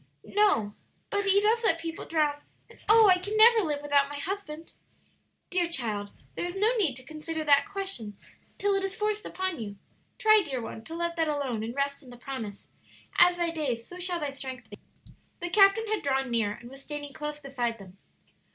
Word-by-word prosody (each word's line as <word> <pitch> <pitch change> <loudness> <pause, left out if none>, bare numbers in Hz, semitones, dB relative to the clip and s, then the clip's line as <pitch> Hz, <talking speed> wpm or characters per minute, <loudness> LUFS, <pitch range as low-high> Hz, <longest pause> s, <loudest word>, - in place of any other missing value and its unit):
'" - - -45
"No, 395 - +2 0.4
but 405 0 0
He 395 0 +5
does 445 +3 +2
let 335 -7 +3
people 330 0 -6
drown; 300 -3 0 0.3
and - - -18
oh, 440 0 +8
I 365 -1 +5
can 410 +4 -3
never 455 +1 +8
live 295 -5 -2
without 285 -1 +3
my 290 - -6
husband!" 330 -1 -6 0.8
"Dear 355 -2 +1
child, 215 -9 -1 0.2
there - - -4
is 350 +1 -4
no 430 +5 +3
need 355 - +1
to 255 - -9
consider 310 +3 -5
that 290 +6 +4
question 385 - -4 0.4
till 405 0 +1
it 390 0 +1
is 390 0 -3
forced 425 0 -2
upon 375 -5 -3
you. 205 -3 -6 0.4
Try, 435 -1 +6
dear 270 -6 -3
one, 225 -1 -7
to 325 - -7
let 340 0 -3
that 325 -1 +1
alone, 280 -7 -2
and 230 +3 -5
rest 280 0 -1
in 260 - -15
the 245 - -11
promise, 235 -5 -7 0.5
'As 355 0 +6
thy 340 -1 0
days, 265 -8 -2
so 360 - -11
shall 355 -1 0
thy 295 -3 -2
strength 260 -4 -8
be.'" 205 - -10 0.6
The 350 -1 -4
captain 400 +3 +5
had 435 0 -1
drawn 270 -2 0
near, 225 -3 +1
and 235 +2 -12
was 270 0 -12
standing 290 0 -7
close 300 +1 -5
beside 250 -5 -3
them. 195 -2 -14
305 Hz, 205 wpm, -28 LUFS, 260-390 Hz, 0.8 s, oh